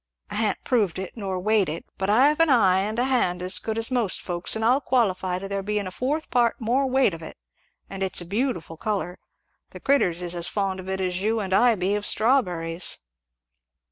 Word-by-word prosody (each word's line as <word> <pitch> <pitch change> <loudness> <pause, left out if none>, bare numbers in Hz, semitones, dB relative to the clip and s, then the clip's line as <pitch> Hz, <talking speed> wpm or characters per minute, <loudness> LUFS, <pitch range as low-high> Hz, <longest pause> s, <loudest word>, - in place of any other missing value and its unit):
I - - -5
ha'n't 215 -1 -1
proved 210 -9 +1
it 190 -1 -6
nor 195 -4 -3
weighed 210 -2 +2
it, 160 +2 -5
but 190 +1 -1
I've 275 +8 +4
an 330 -1 +4
eye 195 -8 +4
and 210 +3 -2
a 245 - +2
hand 210 -9 +1
as 185 +1 +1
good 220 0 -4
as 225 +3 +3
most 235 -7 0
folks', 175 +2 -3
and 220 0 -1
I'll 255 +5 +3
qualify 190 -9 0
to 195 +2 -6
there 200 0 -2
being 205 0 -2
a 185 - -5
fourth 290 - -3
part 240 -2 +2
more 255 +4 +1
weight 260 -6 +2
of 165 - -8
it; 160 - -10 0.5
and 195 0 -8
it's 190 -1 +1
a 175 - -4
beautiful 195 - -2
colour. 190 -2 -3 0.5
The - - -11
critters 180 -11 +1
is 175 0 -3
as 175 -1 -4
fond 195 -2 -2
of 185 0 -8
it 190 0 -2
as 180 0 -1
you 220 +2 +1
and 190 -3 -3
I 240 +3 +5
be 190 +1 -1
of 205 0 -1
strawberries." 180 -8 0
200 Hz, 220 wpm, -24 LUFS, 185-240 Hz, 0.5 s, I